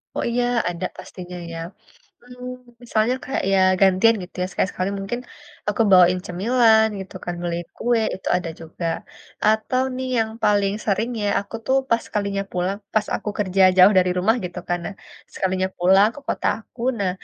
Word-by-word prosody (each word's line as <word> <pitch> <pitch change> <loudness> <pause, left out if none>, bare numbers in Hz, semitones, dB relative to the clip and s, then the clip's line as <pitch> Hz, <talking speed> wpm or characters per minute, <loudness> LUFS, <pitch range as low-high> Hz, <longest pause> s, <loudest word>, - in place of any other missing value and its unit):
Oh, - - -1
iya, 245 +1 +1 0.3
ada 175 +1 -4
pastinya 180 -1 -9
ya. 165 - -6 0.6
Hmm, 250 +1 -9 0.3
misalnya 230 +1 +1
kayak 270 - -2
ya 195 - +4 0.2
gantian 195 +4 +5
gitu 180 - -16
ya, - - 0
sekali 190 - 0
sekali 185 +2 -2
mungkin 195 +5 -4 0.5
aku 210 +2 +2
bawain 180 -1 +6
cemilan 220 +4 +4
gitu 190 - -9
kan, 175 - -3
beli 170 -1 -2 0.2
kue 240 -1 +1
itu 190 - -5
ada 175 -2 -3
juga. 165 +1 -6 0.6
Atau 220 +4 +2
nih 260 0 -3
yang 220 -1 +1
paling 200 -1 +3
sering 220 +3 0
ya, 205 - +1
aku 200 +2 -13
tuh 265 - +3
pas 230 -1 +2
sekalinya 200 -1 -2
pulang, 180 +3 -1 0.2
pas 215 -1 +3
aku - - -6
kerja 195 -2 +2
jauh 190 +2 +8
dari 180 0 +3
rumah, 220 +6 +3
gitu 180 0 -5
kan. 175 - 0
Nah, 200 - -6 0.4
sekalinya 185 0 -1
pulang 190 +4 +5
ke - - -8
kota - - -1
aku, 230 +2 -17 0.2
nah, 195 -2 0
200 Hz, 180 wpm, -22 LUFS, 185-225 Hz, 0.6 s, jauh